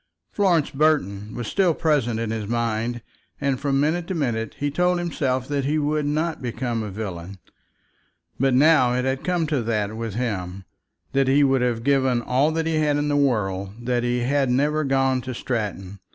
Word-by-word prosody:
Florence 180 Hz, -7 st, +2 dB
Burton 120 Hz, -9 st, 0 dB
was 120 Hz, -, -4 dB
still 185 Hz, -5 st, +2 dB
present 140 Hz, -8 st, +1 dB
to 115 Hz, -, -1 dB
his 110 Hz, -2 st, -4 dB
mind, 115 Hz, +1 st, -1 dB, 0.4 s
and 140 Hz, -3 st, 0 dB
from 140 Hz, -1 st, 0 dB
minute 165 Hz, +4 st, 0 dB
to 190 Hz, -, -3 dB
minute 115 Hz, -8 st, -2 dB
he 145 Hz, 0 st, -1 dB
told 180 Hz, +4 st, +2 dB
himself 135 Hz, -7 st, -1 dB
that 145 Hz, -1 st, -1 dB
he 150 Hz, +3 st, +1 dB
would 150 Hz, 0 st, 0 dB
not 155 Hz, +2 st, -1 dB
become 120 Hz, -1 st, -2 dB
a 105 Hz, -, -4 dB
villain. 95 Hz, -2 st, -6 dB, 1.0 s
But 135 Hz, 0 st, +3 dB
now 135 Hz, -3 st, +5 dB
it 125 Hz, +1 st, 0 dB
had 130 Hz, 0 st, -1 dB
come 180 Hz, -2 st, 0 dB
to 150 Hz, -4 st, 0 dB
that 110 Hz, -2 st, -1 dB
with 115 Hz, -2 st, -5 dB
him, 95 Hz, -6 st, -3 dB, 0.5 s
that 135 Hz, -1 st, +2 dB
he 140 Hz, +2 st, +4 dB
would 135 Hz, -2 st, +3 dB
have 120 Hz, -2 st, 0 dB
given 130 Hz, -3 st, +2 dB
all 130 Hz, +6 st, +2 dB
that 165 Hz, 0 st, -1 dB
he 160 Hz, -1 st, 0 dB
had 150 Hz, -2 st, +2 dB
in 145 Hz, 0 st, 0 dB
the 145 Hz, -, +1 dB
world 105 Hz, -5 st, -1 dB
that 125 Hz, -1 st, +1 dB
he 120 Hz, 0 st, 0 dB
had 135 Hz, +1 st, +1 dB
never 150 Hz, +5 st, +1 dB
gone 135 Hz, -2 st, +1 dB
to 130 Hz, 0 st, -6 dB
Stratton. 100 Hz, -6 st, -4 dB
130 Hz, 190 wpm, -23 LUFS, 115-145 Hz, 1.0 s, now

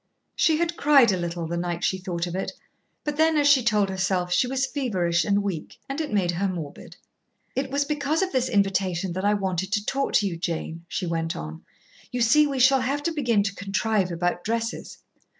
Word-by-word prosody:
She 320 Hz, -2 st, +3 dB
had 335 Hz, 0 st, -1 dB
cried 280 Hz, -6 st, +5 dB
a -, -, +1 dB
little 175 Hz, -1 st, -3 dB
the 170 Hz, +1 st, -3 dB
night 175 Hz, 0 st, -3 dB
she 190 Hz, -, +1 dB
thought 180 Hz, -2 st, -3 dB
of 175 Hz, -, -6 dB
it, 190 Hz, -, -3 dB, 0.5 s
but 295 Hz, -1 st, -3 dB
then, 320 Hz, 0 st, +3 dB
as 290 Hz, -1 st, +3 dB
she 285 Hz, -2 st, +6 dB
told 210 Hz, -3 st, +2 dB
herself, 185 Hz, -2 st, 0 dB
she 250 Hz, -, +3 dB
was 265 Hz, +1 st, 0 dB
feverish 185 Hz, -, 0 dB
and 200 Hz, +4 st, +1 dB
weak, 185 Hz, -6 st, -5 dB
and 275 Hz, +4 st, -3 dB
it 305 Hz, -, -4 dB
made 190 Hz, -4 st, +1 dB
her 185 Hz, +3 st, -1 dB
morbid. 165 Hz, -6 st, -7 dB, 0.6 s
"It 265 Hz, 0 st, -1 dB
was 285 Hz, +1 st, 0 dB
because 295 Hz, +3 st, 0 dB
of 375 Hz, -, -2 dB
this 255 Hz, -1 st, 0 dB
invitation 195 Hz, -3 st, 0 dB
that 185 Hz, +2 st, -3 dB
I 205 Hz, +1 st, +3 dB
wanted 190 Hz, -1 st, -2 dB
to 210 Hz, -1 st, 0 dB
talk 275 Hz, +3 st, -1 dB
to 205 Hz, -, +3 dB
you, 170 Hz, -3 st, -4 dB
Jane," 165 Hz, 0 st, -4 dB
she 185 Hz, -, -3 dB
went 165 Hz, -1 st, -2 dB
on. 75 Hz, +1 st, -7 dB, 0.5 s
"You 245 Hz, -, -2 dB
see, 295 Hz, +6 st, +5 dB
we 275 Hz, -2 st, -3 dB
shall 260 Hz, +1 st, +5 dB
have 280 Hz, +3 st, -1 dB
to 335 Hz, -, 0 dB
begin 245 Hz, -10 st, +1 dB
to 200 Hz, -1 st, -2 dB
contrive 200 Hz, -1 st, 0 dB
about 175 Hz, +1 st, -1 dB
dresses." 230 Hz, +1 st, -3 dB
200 Hz, 215 wpm, -25 LUFS, 175-270 Hz, 0.6 s, she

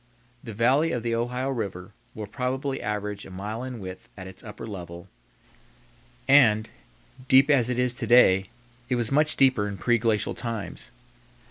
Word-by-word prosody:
The 115 Hz, -4 st, -8 dB
valley 135 Hz, +8 st, +3 dB
of 120 Hz, -3 st, -3 dB
the 115 Hz, -1 st, -1 dB
Ohio 125 Hz, +3 st, -2 dB
River 100 Hz, -6 st, -5 dB, 0.2 s
will 110 Hz, -, -5 dB
probably 130 Hz, +5 st, -3 dB
average 105 Hz, -1 st, -4 dB
a -, -, -11 dB
mile 105 Hz, +5 st, -5 dB
in 130 Hz, -2 st, -6 dB
width 95 Hz, -2 st, -9 dB
at 95 Hz, -, -8 dB
its 95 Hz, 0 st, -11 dB
upper 105 Hz, 0 st, -9 dB
level 85 Hz, -5 st, -8 dB, 1.2 s
and, 115 Hz, -6 st, +5 dB, 0.6 s
deep 135 Hz, +3 st, +6 dB
as 125 Hz, -4 st, +3 dB
it 125 Hz, -, -1 dB
is 125 Hz, -1 st, +2 dB
to 120 Hz, -2 st, -5 dB
day, 95 Hz, -5 st, +5 dB, 0.4 s
it 125 Hz, -, +1 dB
was 120 Hz, -1 st, -1 dB
much 150 Hz, +2 st, +3 dB
deeper 130 Hz, -6 st, +3 dB
in 100 Hz, -1 st, -5 dB
preglacial 115 Hz, 0 st, +1 dB
times. 115 Hz, -4 st, -5 dB
115 Hz, 160 wpm, -25 LUFS, 105-125 Hz, 1.2 s, deep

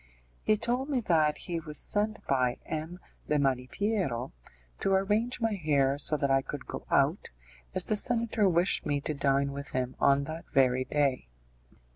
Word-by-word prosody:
He 215 Hz, -, +2 dB
told 245 Hz, +6 st, -1 dB
me 270 Hz, -3 st, +1 dB
that 155 Hz, -7 st, +2 dB
he 170 Hz, -2 st, -4 dB
was 155 Hz, -2 st, -6 dB
sent 215 Hz, +1 st, -1 dB
by 125 Hz, -2 st, +1 dB
M. 160 Hz, +3 st, -5 dB, 0.3 s
de 150 Hz, -, +3 dB
Malipiero 135 Hz, -, -1 dB, 0.5 s
to 195 Hz, -, +1 dB
arrange 210 Hz, +6 st, +1 dB
my 225 Hz, -2 st, 0 dB
hair 145 Hz, -6 st, +1 dB
so 150 Hz, +1 st, +1 dB
that 140 Hz, -2 st, 0 dB
I 135 Hz, 0 st, +4 dB
could 140 Hz, 0 st, -7 dB
go -, -, -7 dB
out, -, -, +2 dB, 0.5 s
as -, -, +3 dB
the 215 Hz, -, +1 dB
senator 225 Hz, -2 st, +2 dB
wished 175 Hz, +2 st, +2 dB
me 145 Hz, -1 st, 0 dB
to 155 Hz, -, -3 dB
dine 140 Hz, -1 st, +1 dB
with 140 Hz, 0 st, -7 dB
him 130 Hz, 0 st, -2 dB
on 140 Hz, 0 st, +4 dB
that 160 Hz, +3 st, -7 dB
very 130 Hz, -1 st, +3 dB
day. 140 Hz, -, 0 dB
150 Hz, 170 wpm, -29 LUFS, 140-205 Hz, 0.5 s, I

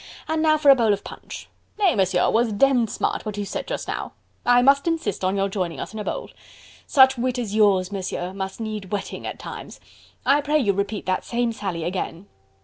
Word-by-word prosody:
"And 315 Hz, 0 st, 0 dB
now 310 Hz, -1 st, +4 dB
for 290 Hz, -2 st, +6 dB
a -, -, +8 dB
bowl 225 Hz, -4 st, +3 dB
of 200 Hz, -, -4 dB
punch.... -, -, -9 dB, 0.3 s
Nay, 395 Hz, -6 st, +3 dB
Monsieur, 185 Hz, -3 st, +2 dB
'twas 230 Hz, 0 st, +2 dB
demmed 240 Hz, +1 st, +3 dB
smart -, -, -2 dB
what 210 Hz, -2 st, -5 dB
you 205 Hz, -, -2 dB
said -, -, -5 dB
just -, -, -4 dB
now... -, -, -4 dB, 0.3 s
I 245 Hz, 0 st, +6 dB
must 280 Hz, +3 st, +4 dB
insist 320 Hz, -, -1 dB
on 190 Hz, +2 st, +1 dB
your 195 Hz, 0 st, +1 dB
joining 185 Hz, -4 st, -3 dB
us -, -, -6 dB
in 220 Hz, -, -6 dB
a -, -, -3 dB
bowl.... -, -, -4 dB, 0.6 s
Such 265 Hz, -2 st, +5 dB
wit 250 Hz, +1 st, 0 dB
as 225 Hz, -5 st, -3 dB
yours, 200 Hz, -3 st, +3 dB
Monsieur, 185 Hz, -2 st, -4 dB
must 190 Hz, +1 st, -5 dB
need 215 Hz, -3 st, -4 dB
whetting 200 Hz, -1 st, -4 dB
at -, -, -5 dB
times.... -, -, -9 dB, 0.5 s
I 290 Hz, -, +4 dB
pray 295 Hz, +1 st, +1 dB
you 215 Hz, -9 st, +2 dB
repeat 200 Hz, +2 st, -3 dB
that 185 Hz, 0 st, 0 dB
same 235 Hz, -1 st, -1 dB
sally 190 Hz, -6 st, -4 dB
again..." 180 Hz, +1 st, -4 dB
215 Hz, 215 wpm, -23 LUFS, 195-265 Hz, 0.6 s, a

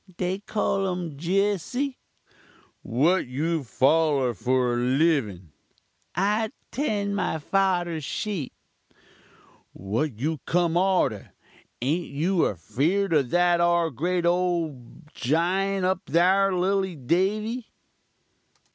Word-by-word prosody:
"'They 185 Hz, +1 st, -1 dB
call 200 Hz, -1 st, -1 dB
um 180 Hz, -4 st, -4 dB
Jesse.' 200 Hz, -, -1 dB, 0.8 s
"'What 160 Hz, +9 st, +1 dB
you 160 Hz, +6 st, -1 dB
follur 135 Hz, 0 st, +2 dB
for 125 Hz, +1 st, +1 dB
livin?' 125 Hz, -, +1 dB, 0.6 s
"'I 210 Hz, +5 st, +1 dB, 0.2 s
'tend 205 Hz, -8 st, -1 dB
my 190 Hz, -, -1 dB
farder's 175 Hz, -1 st, 0 dB
sheep.' 185 Hz, -, -3 dB, 1.2 s
"'What 110 Hz, -, -3 dB
you 155 Hz, +5 st, -2 dB
kum 170 Hz, -1 st, +1 dB
arter? 180 Hz, -, +1 dB, 0.5 s
Ain't 160 Hz, +7 st, -1 dB
you 165 Hz, +7 st, 0 dB
affeerd 150 Hz, -, -1 dB
of 140 Hz, -5 st, +2 dB
that 175 Hz, +1 st, +3 dB
'ar 170 Hz, -1 st, +2 dB
grate 175 Hz, +6 st, -1 dB
ugly -, -, +4 dB
ole 170 Hz, -7 st, -1 dB, 0.3 s
jiunt 185 Hz, +7 st, 0 dB
up 185 Hz, 0 st, +1 dB
thar, 190 Hz, +4 st, +3 dB
lilly 190 Hz, 0 st, 0 dB
Davy?' 210 Hz, -, -1 dB
170 Hz, 100 wpm, -25 LUFS, 140-195 Hz, 1.2 s, ugly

